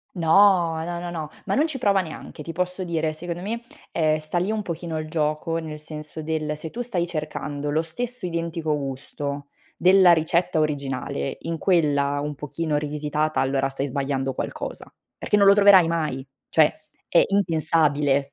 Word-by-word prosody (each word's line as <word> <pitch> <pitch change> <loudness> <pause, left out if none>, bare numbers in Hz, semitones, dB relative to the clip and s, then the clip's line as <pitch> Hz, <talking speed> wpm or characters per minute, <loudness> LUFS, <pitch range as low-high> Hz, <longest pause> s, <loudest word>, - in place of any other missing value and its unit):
No, 170 -1 +4
no, 170 +1 -4
no, 175 0 -5
no, 155 -3 -5 0.2
ma - - -1
non 305 +4 +3
ci 310 - -3
prova 200 -6 +3
neanche. 160 -2 -9
Ti 165 +2 -6
posso 180 +2 -2
dire, 160 -3 -1
secondo 170 +2 -5
me, 225 +5 -3 0.3
ehm, 155 -1 +2
sta 155 +3 -2
lì 185 - -1
un 215 -1 -2
pochino 170 -2 -4
il 155 0 -4
gioco, 155 +1 -1
nel 155 -2 -6
senso 155 0 -7
del 155 -1 -2
se 160 +1 -7
tu 245 - -4
stai 200 -8 -1
cercando 150 -3 -4
lo 155 +2 +1
stesso 240 +7 -4
identico 165 -2 -2
gusto 140 +1 -5 0.3
della 185 0 +7
ricetta 165 +1 +1
originale 135 - -2
in 165 -1 -4
quella 145 -6 +2
un 150 +1 -3
pochino 150 +2 -2
rivisitata, 150 +1 -1
allora 135 0 +1
stai 135 +1 -3
sbagliando 135 0 -2
qualcosa. - - -5 0.3
Perché 210 - +1
non 200 - +5
lo 195 - +8
troverai 200 -4 +7
mai, 155 -6 -2 0.2
cioè - - +4 0.3
è - - +5
impensabile. 155 -7 +2
160 Hz, 170 wpm, -24 LUFS, 150-175 Hz, 0.3 s, lo